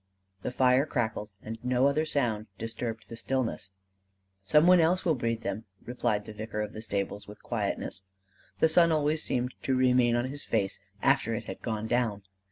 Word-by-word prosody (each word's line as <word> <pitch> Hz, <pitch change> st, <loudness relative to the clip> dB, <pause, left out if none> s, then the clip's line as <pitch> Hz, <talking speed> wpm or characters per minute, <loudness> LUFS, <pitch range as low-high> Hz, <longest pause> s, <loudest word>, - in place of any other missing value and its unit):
The -, -, -2 dB
fire 130 Hz, +3 st, +3 dB
crackled, 110 Hz, -5 st, -2 dB
and 110 Hz, +1 st, -6 dB
no 125 Hz, +1 st, +2 dB
other 145 Hz, +3 st, +2 dB
sound 115 Hz, -8 st, 0 dB
disturbed 115 Hz, 0 st, -5 dB
the 115 Hz, -, -8 dB
stillness. 120 Hz, -5 st, -2 dB, 0.7 s
"Some 150 Hz, +11 st, +4 dB
one 180 Hz, 0 st, +7 dB
else 175 Hz, +3 st, +3 dB
will 165 Hz, -, +4 dB
breed 115 Hz, -4 st, -1 dB
them," 100 Hz, +2 st, -4 dB, 0.2 s
replied 105 Hz, -4 st, -1 dB
the 110 Hz, -, -8 dB
vicar 105 Hz, 0 st, -4 dB
of 105 Hz, -, -6 dB
the 110 Hz, -, -6 dB
stables, 100 Hz, -1 st, -3 dB
with 105 Hz, +1 st, -12 dB
quietness: -, -, -2 dB, 0.6 s
the -, -, +6 dB
sun 170 Hz, +1 st, +5 dB
always 155 Hz, 0 st, +2 dB
seemed 125 Hz, +1 st, -1 dB
to 135 Hz, -, +1 dB
remain 125 Hz, -2 st, +4 dB
on 120 Hz, +1 st, +1 dB
his 140 Hz, +2 st, -5 dB
face 100 Hz, -4 st, 0 dB, 0.2 s
after -, -, +3 dB
it -, -, -4 dB
had -, -, -8 dB
gone 110 Hz, -1 st, -3 dB
down. 110 Hz, -4 st, 0 dB
120 Hz, 180 wpm, -29 LUFS, 110-135 Hz, 0.7 s, one